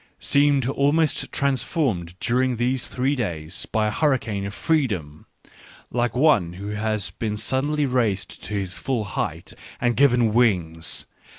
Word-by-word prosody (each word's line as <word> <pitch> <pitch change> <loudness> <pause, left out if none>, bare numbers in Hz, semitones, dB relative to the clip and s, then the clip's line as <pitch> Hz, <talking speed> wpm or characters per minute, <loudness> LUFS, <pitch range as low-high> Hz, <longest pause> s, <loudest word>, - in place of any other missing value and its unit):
seemed 140 -3 +3
almost 145 +3 +1
transformed 120 - -1
during 125 +1 +1
these 125 +2 0
three 130 +3 0
days 85 - -3
by 110 -1 0
a 105 - 0
hurricane 115 -8 0
of 100 - -7
freedom, 100 - -1 0.6
like 120 0 0
one 125 - +3
who 100 +3 -6
has 105 -1 -2
been 105 -2 -3
suddenly 140 +6 0
raised 115 -7 -1
to 105 - -5
his 95 -2 -3
full 130 -5 -1
height 100 - -4 0.3
and 120 -1 +1
given 125 -5 +4
wings. 90 -9 +1
120 Hz, 135 wpm, -23 LUFS, 100-135 Hz, 0.6 s, given